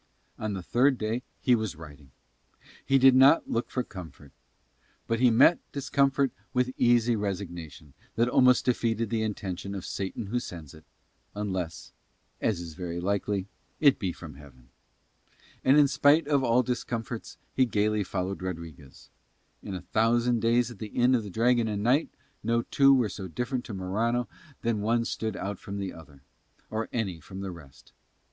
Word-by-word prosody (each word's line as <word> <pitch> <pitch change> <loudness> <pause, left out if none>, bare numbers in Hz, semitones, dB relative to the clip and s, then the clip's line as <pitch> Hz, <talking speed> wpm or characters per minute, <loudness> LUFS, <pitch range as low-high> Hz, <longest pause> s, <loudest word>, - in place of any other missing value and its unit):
On 110 -1 -2
the 95 -2 -5
third 130 +7 +3
day 110 +3 -2 0.2
he 125 - +3
was 110 -7 0
riding. 75 -3 -13 0.7
He 135 - +3
did 135 0 +7
not 135 +5 +6
look 115 - -1
for 125 - -1
comfort. 80 - -11 0.7
But 115 0 -1
he 125 0 +5
met 130 +9 +5
discomfort 140 -1 +1 0.2
with 125 0 +2
an - - -7
easy 120 -1 +4
resignation 85 -8 -5 0.2
that 120 +1 +2
almost 125 0 +4
defeated 115 -3 0
the 115 -1 0
intention 100 -2 -4
of 95 - -6
Satan 95 +3 -4
who 120 +5 -1
sends 85 - -9
it, 80 -2 -16 0.5
unless 95 -5 -4 0.5
as 105 -6 0
is 85 -2 -7
very 85 0 -5
likely 100 +1 -1 0.3
it 140 -3 +5
be 95 -4 -1
from 80 -3 -10
Heaven. 65 -3 -16 0.9
And 135 +3 +5
in 145 -1 +6
spite 145 +2 +4
of 140 -3 +2
all 125 +1 +3
discomforts 120 -2 -4 0.2
he 130 -1 +3
gaily 105 -1 +1
followed 95 0 -3
Rodriguez. 85 -7 -8 0.5
In 95 - -6
a 90 - -5
thousand 115 +5 +2
days 120 +1 +2
at 115 - -12
the 110 - -5
Inn 125 +4 +2
of 125 - +3
the 105 - -8
Dragon 120 +3 +2
and 105 -1 -2
Knight 130 +7 +3 0.3
no 115 0 +1
two 140 +2 +4
were 130 -5 +4
so 95 -1 -7
different 120 - -3
to 110 - -7
Morano 110 +6 -1 0.4
that 115 -1 +1
one 115 +3 +1
stood 110 -3 -3
out 100 -1 -4
from 100 0 -7
the 95 -2 -4
other, 70 -4 -15 0.5
or 110 +1 -2
any 100 -8 -2
from 95 +5 -9
the 95 -1 -4
rest. 75 -7 -15
110 Hz, 170 wpm, -28 LUFS, 95-120 Hz, 0.9 s, did